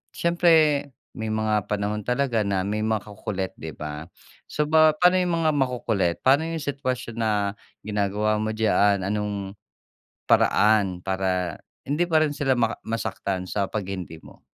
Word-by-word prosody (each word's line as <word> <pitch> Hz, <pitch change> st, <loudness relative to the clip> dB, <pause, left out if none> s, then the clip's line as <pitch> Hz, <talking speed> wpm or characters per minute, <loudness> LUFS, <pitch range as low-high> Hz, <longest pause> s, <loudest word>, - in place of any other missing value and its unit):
siyempre 160 Hz, -4 st, +3 dB, 0.2 s
may 110 Hz, -1 st, -4 dB
mga 110 Hz, -2 st, 0 dB
panahon 105 Hz, 0 st, -1 dB
talaga 125 Hz, 0 st, 0 dB
na 100 Hz, -2 st, -1 dB
may 105 Hz, +1 st, -2 dB
makukulit 105 Hz, -3 st, -3 dB
di 80 Hz, -, -6 dB
ba? 75 Hz, +1 st, -6 dB, 0.4 s
So, 150 Hz, -, 0 dB
ba 155 Hz, 0 st, +6 dB
pano 180 Hz, +2 st, +5 dB
yung 180 Hz, -1 st, 0 dB
mga 155 Hz, -, +3 dB
makukulit? 120 Hz, -9 st, 0 dB
Paano 140 Hz, +4 st, +5 dB
yung 165 Hz, -1 st, -3 dB
sitwasyon 130 Hz, -5 st, -3 dB
na 110 Hz, -1 st, +1 dB, 0.5 s
ginagawa 105 Hz, +1 st, 0 dB
mo 110 Hz, 0 st, -1 dB
diyaan? 100 Hz, -3 st, +2 dB
Anong 100 Hz, -1 st, -3 dB, 0.8 s
paraan 100 Hz, -4 st, +3 dB
para 95 Hz, -1 st, -1 dB, 0.3 s
hindi 150 Hz, +5 st, +1 dB
pa 160 Hz, -2 st, +2 dB
rin 145 Hz, -2 st, 0 dB
sila 135 Hz, -2 st, +1 dB
maka 115 Hz, -2 st, +1 dB
masaktan 100 Hz, -4 st, -3 dB
sa 100 Hz, -1 st, -1 dB
pag 105 Hz, +2 st, -3 dB
"hindi" 90 Hz, -4 st, -6 dB
mo? -, -, -17 dB
110 Hz, 150 wpm, -24 LUFS, 100-135 Hz, 0.8 s, ba